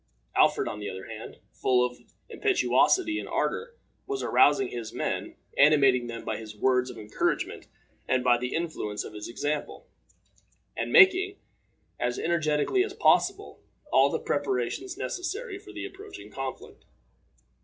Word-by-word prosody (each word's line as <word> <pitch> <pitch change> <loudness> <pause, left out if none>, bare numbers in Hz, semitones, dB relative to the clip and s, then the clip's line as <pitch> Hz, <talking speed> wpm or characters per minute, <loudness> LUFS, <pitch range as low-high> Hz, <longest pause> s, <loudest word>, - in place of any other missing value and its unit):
Alfred, - - +3
on 105 - -5
the 105 - -4
other 95 0 -7
hand, - - -9 0.2
full 125 -1 +2
of 125 0 -6 0.3
impetuosity 370 -4 +2
and - - -7
ardor, 475 0 -2 0.3
was 405 -1 -3
arousing 140 -3 +4
his 115 -2 -6
men, - - -3 0.2
animating 135 -4 +5
them 115 -1 -7
by 110 - -2
his 110 -1 -9
words 125 +2 +2
of 125 - -9
encouragement 105 -1 -2 0.4
and 130 -1 +1
by 125 -1 +5
the 125 +1 -3
influence 155 -11 -3
of - - -9
his 105 +1 -7
example, 145 +5 -3 0.9
and - - -3
making, 390 0 +6 0.6
as 120 0 -1
energetically 160 - +1
as 395 -1 -6
possible, - - +2 0.3
all - - +6
the - - -1
preparations 385 -2 -2
necessary 395 +2 -4
for 395 -1 -13
the 335 -1 -6
approaching 395 0 -11
conflict. 135 -1 -7
145 Hz, 145 wpm, -27 LUFS, -, 0.9 s, making